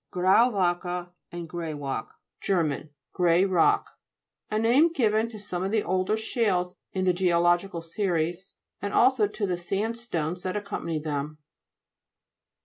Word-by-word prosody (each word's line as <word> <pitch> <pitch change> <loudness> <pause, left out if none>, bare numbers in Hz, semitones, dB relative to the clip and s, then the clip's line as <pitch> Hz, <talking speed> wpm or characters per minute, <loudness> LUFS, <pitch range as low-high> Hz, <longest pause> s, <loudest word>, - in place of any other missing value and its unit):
GRAU'WACKE, 180 -3 +2 0.2
and 170 -1 -6
GRATWACKE 150 -7 -4 0.3
Ger. 155 -6 0 0.2
Grey 175 0 +3
rock. 185 -4 +2 0.5
A 215 - -1
name 250 +9 +4
given 225 -6 +1
to 225 - -9
some 190 -4 -5
of 190 - -1
the 215 0 +1
older 185 +3 0
shales 200 -5 0 0.2
in 185 -1 -1
the 180 - +4
geological 175 0 +2
series, 175 0 -2 0.3
and 205 0 -3
also 250 -4 +4
to 210 +1 -3
the 180 -2 -1
sandstones 195 -3 -3
that 185 +2 -2
accompany 200 -5 -3
them. 150 0 -3
185 Hz, 130 wpm, -27 LUFS, 170-210 Hz, 0.5 s, name